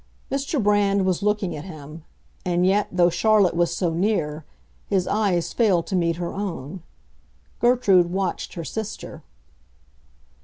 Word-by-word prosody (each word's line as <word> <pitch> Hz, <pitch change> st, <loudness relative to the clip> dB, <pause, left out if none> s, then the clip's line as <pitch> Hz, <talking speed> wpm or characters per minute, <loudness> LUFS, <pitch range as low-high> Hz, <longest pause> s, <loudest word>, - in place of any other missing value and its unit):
Mr. 275 Hz, +3 st, -1 dB
Brand 200 Hz, -2 st, +2 dB
was 185 Hz, 0 st, 0 dB
looking 210 Hz, -3 st, 0 dB
at 150 Hz, -, -7 dB
him; 155 Hz, -2 st, -10 dB, 0.4 s
and 175 Hz, 0 st, +1 dB
yet, 200 Hz, +2 st, +2 dB
though 175 Hz, -1 st, +3 dB
Charlotte 200 Hz, 0 st, +3 dB
was 170 Hz, 0 st, +2 dB
so 170 Hz, -1 st, -1 dB
near, 165 Hz, -5 st, -1 dB, 0.4 s
his 190 Hz, -2 st, +1 dB
eyes 195 Hz, -5 st, 0 dB
failed 195 Hz, -8 st, +2 dB
to 190 Hz, -, -3 dB
meet 170 Hz, -2 st, +1 dB
her 170 Hz, 0 st, -4 dB
own. 180 Hz, -4 st, -5 dB, 0.8 s
Gertrude 225 Hz, -8 st, +4 dB
watched 190 Hz, -1 st, -3 dB
her 170 Hz, -, -5 dB
sister. 220 Hz, +5 st, -6 dB
185 Hz, 140 wpm, -23 LUFS, 170-205 Hz, 0.8 s, Gertrude